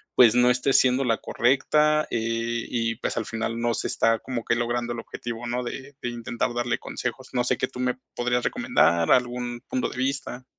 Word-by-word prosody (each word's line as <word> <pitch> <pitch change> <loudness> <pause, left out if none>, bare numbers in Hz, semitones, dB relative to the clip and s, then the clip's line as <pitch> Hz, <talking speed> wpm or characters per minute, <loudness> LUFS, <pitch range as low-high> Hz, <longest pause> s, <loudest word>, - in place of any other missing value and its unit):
pues 120 -4 +7
no 125 0 +5
esté 125 +2 +2
siendo 130 +1 +4
la 115 -3 +1
correcta, 150 +5 +2
eh, 115 0 -1
y 115 -1 -1
pues 125 - -3
al 115 - -1
final 115 +1 -3
no 120 0 +1
se - - -2
está 115 0 +2
como 125 -1 -4
que 115 - +1
logrando 120 0 -1
el 120 - -5
objetivo, 120 +1 -6
¿no?, 125 +1 -1
de 135 +3 -7
de 120 - -2
intentar 120 +1 -2
darle 120 -1 0
consejos. 125 +1 -5
¿No 125 -1 +1
sé 125 - +1
qué 130 - 0
tú - - -11
me 125 -1 0 0.2
podrías 120 0 0
recomendar, 165 - +2
algún 120 -1 +1
punto 130 - 0
de - - -9
vista? 130 -1 -2
120 Hz, 205 wpm, -25 LUFS, 115-125 Hz, 0.2 s, pues